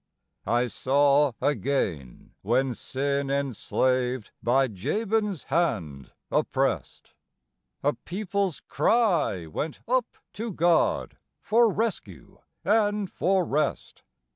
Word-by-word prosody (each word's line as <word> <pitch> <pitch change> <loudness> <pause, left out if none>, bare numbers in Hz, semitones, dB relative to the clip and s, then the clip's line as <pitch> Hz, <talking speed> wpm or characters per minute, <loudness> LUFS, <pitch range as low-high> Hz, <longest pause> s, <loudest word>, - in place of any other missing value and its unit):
I 120 +3 +2
saw 140 +3 +3
again, 100 - -2
when 125 +5 +1
sin 140 +3 -2
enslaved, 130 -2 0
by 130 +3 +3
Jabin's 205 - -1
hand 100 - -1 0.2
oppressed, - - -1 0.7
A 145 +1 +2
people's 190 - -3
cry 180 - +1
went 145 - -5
up 250 -1 0 0.2
to 225 +2 -4
God 170 0 +2 0.2
for 230 +1 +3
rescue 180 - -4 0.3
and 205 -2 +2
for 185 0 +1
rest. 150 -1 -2
140 Hz, 90 wpm, -26 LUFS, 125-195 Hz, 0.7 s, saw